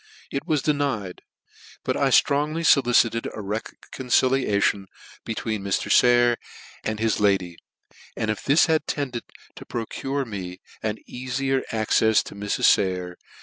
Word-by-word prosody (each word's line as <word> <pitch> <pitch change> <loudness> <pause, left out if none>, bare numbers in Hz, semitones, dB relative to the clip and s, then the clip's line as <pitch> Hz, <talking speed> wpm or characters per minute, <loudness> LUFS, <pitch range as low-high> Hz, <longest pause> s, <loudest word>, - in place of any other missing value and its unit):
It 140 - -4
was 150 -4 +1
denied; 140 -11 -1 0.6
but - - -1
I - - +2
ftrongly 150 +3 +2
folicite4 120 -4 +3
a - - -4
reconciliation 110 0 0 0.4
between 110 -1 -3
Mr. 100 -1 -1
Saycr 120 -1 +5 0.5
and 110 0 -3
his 110 -1 0
lady, 95 -4 +1 0.6
and 110 - 0
if 105 - -4
this 145 +4 +4
had 160 -2 0
tended 130 -5 -3 0.3
to - - -8
procure 135 +4 -4
me 95 -5 -7 0.2
an 110 0 -2
eafier 130 +2 -2
accefs 110 0 +2
to - - -10
Mrs. 100 0 -3
Sayer 90 -2 +2
115 Hz, 130 wpm, -24 LUFS, 105-135 Hz, 0.6 s, Saycr